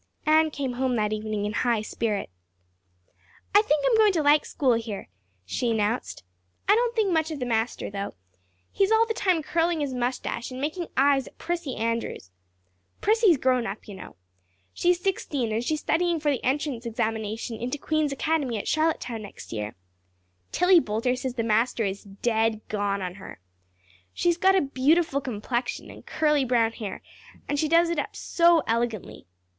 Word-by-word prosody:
Anne 315 +1 +4
came 275 -4 -3
home 255 0 0
that 215 -1 0
evening 215 -1 -2
in 210 - -2
high 230 -2 +1
spirits. 215 - -2 1.2
"I 410 - +8
think 300 -8 +1
I'm - - +4
going 430 -2 +6
to 320 -4 +1
like 295 +1 +4
school 260 -4 +2
here," 225 - -4 0.4
she 235 - -1
announced. 220 - -1 0.4
"I 400 - +6
don't 475 +2 +1
think 425 -4 +2
much 320 -1 +1
of 310 -3 -5
the 250 - -2
master, 225 -2 -1
through. 200 0 -4 0.6
He's 395 +1 +1
all 445 +1 +5
the 450 - -2
time 365 -7 +1
curling 335 +1 +1
his 285 -3 -2
mustache 245 -1 -2
and 255 0 -7
making 315 +5 -3
eyes 275 0 +3
at - - -15
Prissy 340 -6 -3
Andrews. 230 - -3 0.7
Prissy 445 0 +4
is 330 - +5
grown 255 -2 +1
up, 205 - -7
you 205 - -8
know. 190 - -10 0.6
She's 350 0 +2
sixteen 290 - -1
and 225 +2 -1
she's 305 +4 -1
studying 340 0 +1
for 295 -1 +1
the 265 - -2
entrance 265 -3 -1
examination 220 0 -3
into 250 +5 -3
Queen's 310 0 0
Academy 275 -4 0
at 205 - -5
Charlottetown 310 -8 0
next 205 - -10
year. 105 -1 -4 0.8
Tillie 360 -1 +5
Boulter 230 +2 -1
says 255 0 -4
the 230 - -1
master 225 +1 +1
is 195 +1 -4
dead 220 +2 0
gone 200 -2 -1
on 180 -1 -4
her. 100 - -10 0.8
She's 345 -1 +2
got 380 +2 +4
a 380 - +4
beautiful 280 +2 +2
complexion 245 - -3
and - - -13
curly 300 -2 +1
brown 235 -3 +2
hair 215 -3 -7 0.4
and 290 - -1
she 310 - +1
does 335 +2 +4
it 335 - -1
up - - -4
so 340 -2 +3
elegantly. 225 - -2
260 Hz, 175 wpm, -26 LUFS, 225-320 Hz, 1.2 s, I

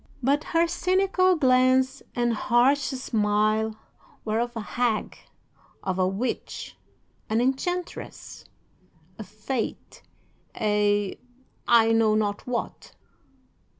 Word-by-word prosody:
"'But 285 +4 +1
her 330 +1 +2
cynical 370 +2 +2
glance 260 -2 +3
and 240 -1 +1
harsh 245 +5 +3
smile 215 -3 0 0.5
were 220 0 0
of 240 0 -2
a - - -3
hag, 235 0 -1 0.7
of 190 -1 -2
a 185 - +3
witch, 200 +7 -4 0.5
an 220 +1 +1
enchantress, 340 +8 -3 0.7
a - - -5
Fate, 215 +4 -5 0.5
a 205 -2 +1 0.5
I 225 -1 +5
know 225 -1 +3
not 205 0 -1
what! 245 -1 -5
235 Hz, 100 wpm, -25 LUFS, 215-265 Hz, 0.7 s, I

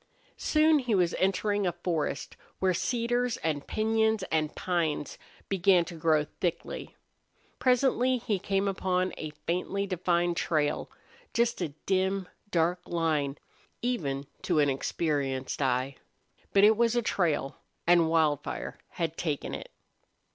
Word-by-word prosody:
Soon 310 0 +4
he 245 -5 0
was 175 -2 +2
entering 195 +1 +1
a - - +2
forest 170 -4 -2 0.2
where 190 -1 +2
cedars 240 +4 0
and 150 -3 -2
piñons 220 -1 +1
and 155 -1 0
pines 165 -5 -1 0.3
began 185 -2 +4
to 170 - -8
grow 160 -2 +2
thickly. 175 -3 -3 0.6
Presently 255 0 +3
he 225 -5 -1
came 195 +2 0
upon 185 -1 0
a 155 - -4 0.2
faintly 185 +3 -1
defined 175 -2 0
trail, 150 -3 0 0.5
just 235 -3 +1
a 155 -5 -3
dim, 190 0 +1 0.2
dark 175 0 +1
line 155 -4 0 0.5
even 145 - -1 0.2
to 175 - 0
an 145 -2 +4
experienced 135 -2 -1
eye. 130 0 0 0.5
But 200 - +5
it 215 +1 +7
was 235 +1 +2
a 240 - +2
trail, 160 -10 0 0.3
and 170 -1 +5
Wildfire 155 -3 0
had 165 -1 -2
taken 150 -5 -2
it. - - -6
175 Hz, 130 wpm, -29 LUFS, 155-205 Hz, 0.6 s, it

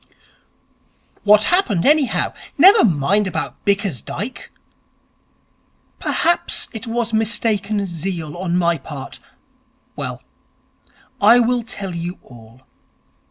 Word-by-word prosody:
'What 210 0 +5
happened, 250 - +2
anyhow? 295 -2 +2 0.2
Never 385 +8 +7
mind 190 +4 +2
about 165 -3 -5
Bickersdyke.' 200 - -3 1.5
'Perhaps 345 +1 +1
it 225 0 -7
was 230 -1 -2
mistaken 215 -2 0
zeal 170 -3 -5
on 175 -1 -2
my 170 -2 +1
part.... 135 -1 -9 0.8
Well, - - -6 1.0
I 220 +4 +7
will 245 +1 +1
tell 205 -5 -6
you 170 +2 -5
all. 120 0 -16
200 Hz, 95 wpm, -19 LUFS, 170-230 Hz, 1.5 s, Never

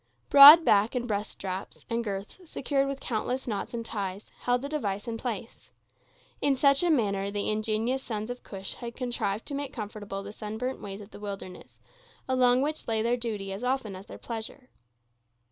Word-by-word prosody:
Broad 290 +4 +11
back 210 +4 +4
and 245 -1 -1
breast 210 -1 -2
straps, 190 0 -6
and 235 -1 -1
girths, 200 - -5
secured 275 0 0
with 275 0 -4
countless 250 +3 -2
knots 205 -4 -3
and 230 -1 -4
ties, 200 -2 -4
held 245 +1 0
the - - -2
device 210 -10 -3
in 230 - -3
place. 225 -1 -6 0.7
In 280 -1 +3
such 275 +1 +4
manner 210 - +1
the 205 +1 -1
ingenious 220 +4 -1
sons 220 -1 -4
of 245 - -7
Cush 195 -1 -6
had 235 -1 -8
contrived 230 -5 -2
to 290 - -6
make 280 -1 -3
comfortable 205 -2 -6
the 205 +1 -8
sunburnt 220 +5 -4
ways 200 0 -7
of 205 - -13
the - - -11
wilderness, 195 -3 -8 0.5
along 255 0 +4
which 305 +2 -3
lay 220 -1 +1
their 235 +1 +2
duty 210 -5 -4
as 200 +5 -7
often 250 -6 -1
as 190 +2 -11
their - - -9
pleasure. 235 +3 -7
225 Hz, 180 wpm, -28 LUFS, 205-255 Hz, 0.7 s, Broad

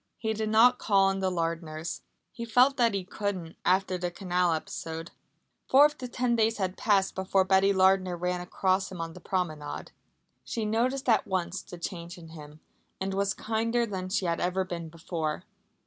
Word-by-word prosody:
He 220 -1 -1
did 215 0 -2
not 235 +3 +5
call 195 -2 +3
on 195 0 -1
the 190 -1 +1
Lardners. 165 -2 -3 0.3
He 235 - -7
felt 250 +4 +4
that 230 -4 +3
he 195 - -1
couldn't 185 -3 -4
after 185 0 +2
the 175 0 -1
canal 180 0 0
episode. 165 +1 -4 0.6
Four 275 +3 +7
of 300 0 0
the 255 - -5
ten 245 -1 0
days 225 0 +2
had 190 -2 -2
passed 195 -3 +2
before 190 0 +2
Betty 190 +1 +4
Lardner 190 -1 +3
ran 180 +1 -1
across 185 +2 0
him 185 - -8
on 165 0 -4
the 180 - -11
promenade. 155 -6 -3 0.5
She 225 -2 -3
noticed 250 +5 0
at 230 - +3
once 185 0 -2
the 175 - -10
change 170 0 -6
in 165 -2 -12
him, 155 -1 -12 0.4
and 190 0 -2
was 195 0 0
kinder 230 +2 0
than 190 -4 -5
she 190 0 0
had 170 -1 0
ever 180 +2 0
been 170 -3 -6
before. 160 -1 -4
190 Hz, 185 wpm, -28 LUFS, 175-215 Hz, 0.6 s, Four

